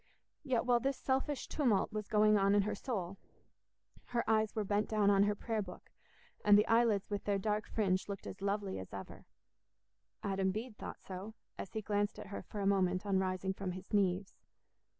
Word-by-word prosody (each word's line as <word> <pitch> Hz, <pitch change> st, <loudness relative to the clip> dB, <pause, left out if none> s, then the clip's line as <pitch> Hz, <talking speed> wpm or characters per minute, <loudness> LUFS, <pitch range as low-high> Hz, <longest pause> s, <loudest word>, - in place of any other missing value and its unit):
Yet 250 Hz, -3 st, 0 dB
while 245 Hz, -1 st, +4 dB
this 270 Hz, +2 st, -1 dB
selfish 270 Hz, +1 st, -1 dB
tumult 240 Hz, -11 st, +1 dB
was 210 Hz, -1 st, -3 dB
going 215 Hz, 0 st, +4 dB
on 200 Hz, 0 st, +4 dB
in 205 Hz, -, +4 dB
her 210 Hz, +1 st, -1 dB
soul, 195 Hz, -5 st, -4 dB, 0.9 s
her 240 Hz, -1 st, -2 dB
eyes 220 Hz, -1 st, +2 dB
were 215 Hz, -, 0 dB
bent 205 Hz, +1 st, 0 dB
down 210 Hz, -2 st, +3 dB
on 195 Hz, -1 st, +4 dB
her 205 Hz, 0 st, +1 dB
prayer 220 Hz, +1 st, -2 dB
book, 180 Hz, -3 st, -10 dB, 0.5 s
and 205 Hz, 0 st, +7 dB
the 210 Hz, -, +4 dB
eyelids 225 Hz, -3 st, +3 dB
with 205 Hz, 0 st, -2 dB
their 205 Hz, -1 st, +2 dB
dark 210 Hz, +1 st, -1 dB
fringe 195 Hz, -3 st, 0 dB
looked 200 Hz, -1 st, -5 dB
as 190 Hz, -, -8 dB
lovely 200 Hz, -1 st, -1 dB
as 95 Hz, -, -9 dB
ever. 95 Hz, -1 st, -8 dB, 1.0 s
Adam 195 Hz, -1 st, +1 dB
Bede 220 Hz, +4 st, -4 dB
thought -, -, -8 dB
so, 195 Hz, +4 st, -7 dB, 0.2 s
as 190 Hz, -, -6 dB
he 220 Hz, -, -3 dB
glanced 205 Hz, 0 st, 0 dB
at -, -, -7 dB
her 200 Hz, -, -5 dB
for 205 Hz, -, -6 dB
a -, -, -1 dB
moment 185 Hz, -1 st, +2 dB
on 195 Hz, -2 st, +2 dB
rising 190 Hz, 0 st, -1 dB
from 190 Hz, -2 st, -4 dB
his 185 Hz, +2 st, -10 dB
knees. 195 Hz, -1 st, +1 dB
205 Hz, 195 wpm, -34 LUFS, 195-215 Hz, 1.0 s, and